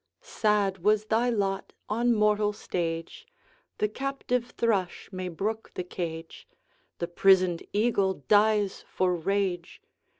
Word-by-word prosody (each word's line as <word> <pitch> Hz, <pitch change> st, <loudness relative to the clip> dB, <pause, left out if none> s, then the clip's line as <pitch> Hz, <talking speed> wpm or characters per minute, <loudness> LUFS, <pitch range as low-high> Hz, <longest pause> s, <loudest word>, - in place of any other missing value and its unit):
'Sad 210 Hz, -, 0 dB
was 210 Hz, +3 st, +2 dB
thy 230 Hz, +3 st, +2 dB
lot 195 Hz, -4 st, -1 dB
on 235 Hz, +3 st, +1 dB
mortal 210 Hz, 0 st, +3 dB
stage! 175 Hz, -, -4 dB, 0.5 s
The 210 Hz, -, +1 dB
captive 250 Hz, 0 st, -2 dB
thrush 200 Hz, -6 st, 0 dB
may 185 Hz, -1 st, -4 dB
brook 215 Hz, +6 st, -3 dB
the 180 Hz, -, -2 dB
cage, 165 Hz, -2 st, -6 dB, 0.5 s
The 170 Hz, -, -3 dB
prisoned 185 Hz, -1 st, +4 dB
eagle 200 Hz, -3 st, +2 dB
dies 210 Hz, -1 st, +3 dB
for 185 Hz, -1 st, +1 dB
rage. 180 Hz, 0 st, -2 dB
205 Hz, 120 wpm, -28 LUFS, 185-220 Hz, 0.5 s, prisoned